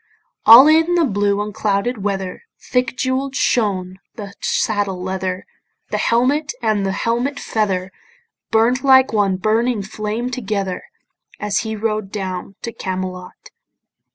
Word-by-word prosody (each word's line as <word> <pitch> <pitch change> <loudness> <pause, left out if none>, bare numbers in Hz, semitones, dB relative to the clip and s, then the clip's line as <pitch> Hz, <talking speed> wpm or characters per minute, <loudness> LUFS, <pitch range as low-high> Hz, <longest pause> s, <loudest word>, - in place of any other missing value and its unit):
All 240 +6 +11
in 325 +3 +4
the 340 -2 +3
blue 205 -3 0
unclouded 210 +1 -2
weather 195 -2 -3
Thick 250 0 -1
jewell'd 260 +1 -1
shone 190 -7 0 0.2
the 205 -4 -8
saddle 205 -4 -1
leather, 185 0 -4 0.5
The - - -1
helmet 280 +6 +1
and 215 -4 0
the 195 - 0
helmet 240 +7 -1
feather 195 -4 -1 0.6
Burn'd 235 +4 +2
like 260 -2 +5
one 200 -3 +1
burning 220 +2 0
flame 215 +4 -4
together, 200 -6 -3 0.5
As 210 -1 0
he 220 -1 -4
rode 215 -2 -2
down 190 -1 -5
to 230 - -4
Camelot. 185 -1 -6
215 Hz, 125 wpm, -19 LUFS, 195-245 Hz, 0.6 s, All